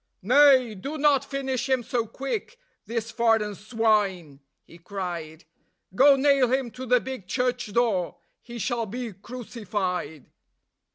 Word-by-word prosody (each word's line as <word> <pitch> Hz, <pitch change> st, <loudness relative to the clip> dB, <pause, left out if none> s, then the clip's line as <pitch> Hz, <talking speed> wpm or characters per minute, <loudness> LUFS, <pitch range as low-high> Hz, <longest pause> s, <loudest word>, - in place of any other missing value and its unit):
"Nay, 255 Hz, 0 st, +5 dB
do 275 Hz, +11 st, -6 dB
not 285 Hz, -2 st, +3 dB
finish 270 Hz, -2 st, -3 dB
him 260 Hz, -2 st, +2 dB
so 235 Hz, -1 st, -2 dB
quick, 275 Hz, -, -5 dB, 0.3 s
this 230 Hz, -1 st, -3 dB
foreign 225 Hz, -3 st, +2 dB
swine," 205 Hz, -, 0 dB, 0.2 s
he 170 Hz, -, -17 dB
cried; 170 Hz, -4 st, -6 dB, 0.5 s
"Go 275 Hz, +7 st, +6 dB
nail 270 Hz, -2 st, +3 dB
him 260 Hz, -2 st, 0 dB
to 255 Hz, +2 st, -8 dB
the 250 Hz, +1 st, +4 dB
big 260 Hz, -7 st, -7 dB
church 250 Hz, -1 st, -1 dB
door: 205 Hz, -6 st, +1 dB, 0.3 s
he 240 Hz, -1 st, -9 dB
shall 235 Hz, 0 st, -2 dB
be 235 Hz, +1 st, -5 dB
crucified." 195 Hz, -, -5 dB
235 Hz, 130 wpm, -25 LUFS, 200-260 Hz, 0.5 s, Go